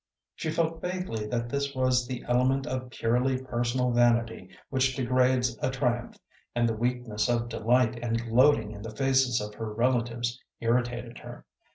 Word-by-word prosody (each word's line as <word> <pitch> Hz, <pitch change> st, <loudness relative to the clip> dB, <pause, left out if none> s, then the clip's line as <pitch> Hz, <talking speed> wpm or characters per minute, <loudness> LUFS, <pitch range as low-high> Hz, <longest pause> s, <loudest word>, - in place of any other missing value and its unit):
She 160 Hz, -, -4 dB
felt 165 Hz, 0 st, -1 dB
vaguely 180 Hz, -13 st, -3 dB
that 115 Hz, +1 st, -2 dB
this 140 Hz, +2 st, -2 dB
was 130 Hz, -1 st, +2 dB
the 125 Hz, -1 st, -5 dB
element 130 Hz, +2 st, +2 dB
of 130 Hz, -3 st, -4 dB
purely 125 Hz, +3 st, +1 dB
personal 125 Hz, 0 st, -1 dB
vanity 115 Hz, -4 st, +2 dB, 0.2 s
which 130 Hz, -1 st, +1 dB
degrades 125 Hz, -1 st, +2 dB
a -, -, +1 dB
triumph, 125 Hz, -3 st, -1 dB, 0.4 s
and 120 Hz, 0 st, +2 dB
the 115 Hz, -, 0 dB
weakness 120 Hz, -1 st, -1 dB
of 120 Hz, -1 st, 0 dB
delight 120 Hz, +1 st, +2 dB
and 115 Hz, -1 st, 0 dB
gloating 120 Hz, -1 st, +3 dB
in 105 Hz, -1 st, -9 dB
the 110 Hz, 0 st, -8 dB
faces 130 Hz, -1 st, +2 dB
of 105 Hz, 0 st, -5 dB
her 110 Hz, 0 st, -5 dB
relatives 120 Hz, +1 st, 0 dB, 0.2 s
irritated 120 Hz, 0 st, -1 dB
her. -, -, -11 dB
120 Hz, 160 wpm, -28 LUFS, 115-130 Hz, 0.4 s, gloating